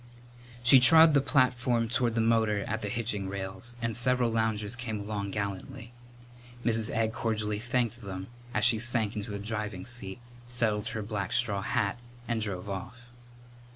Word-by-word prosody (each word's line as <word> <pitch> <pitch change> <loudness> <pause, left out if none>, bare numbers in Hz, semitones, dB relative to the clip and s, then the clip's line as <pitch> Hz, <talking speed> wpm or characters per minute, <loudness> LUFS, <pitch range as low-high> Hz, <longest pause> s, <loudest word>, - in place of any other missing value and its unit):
She 125 +2 +8
trod 160 +4 +8
the 140 - +5
platform 125 -4 +2
toward 120 -1 0
the 115 - +2
motor 110 -3 +2
at 110 +1 -2
the 105 - -3
hitching 105 -3 -2
rails 95 +4 -5
and 115 -1 -1
several 125 -1 +2
loungers 110 -1 0
came 115 -3 -4
along 100 -1 -4
gallantly. 100 +3 -5 0.7
Mrs. 115 -2 +2
Egg 110 0 0
cordially 110 -2 -1
thanked 120 0 -1
them 95 -2 -6 0.3
as 105 -2 +1
she 120 -2 +4
sank 120 -2 +1
into 105 0 -4
the 100 - -4
driving 105 -2 -4
seat, 120 -5 -5 0.3
settled 110 -4 +1
her 110 - -3
black 100 -2 -3
straw 105 -5 +1
hat, 110 +1 -1 0.3
and 115 -2 -1
drove 100 -3 -4
off. 100 +5 -6
110 Hz, 160 wpm, -29 LUFS, 105-120 Hz, 0.7 s, She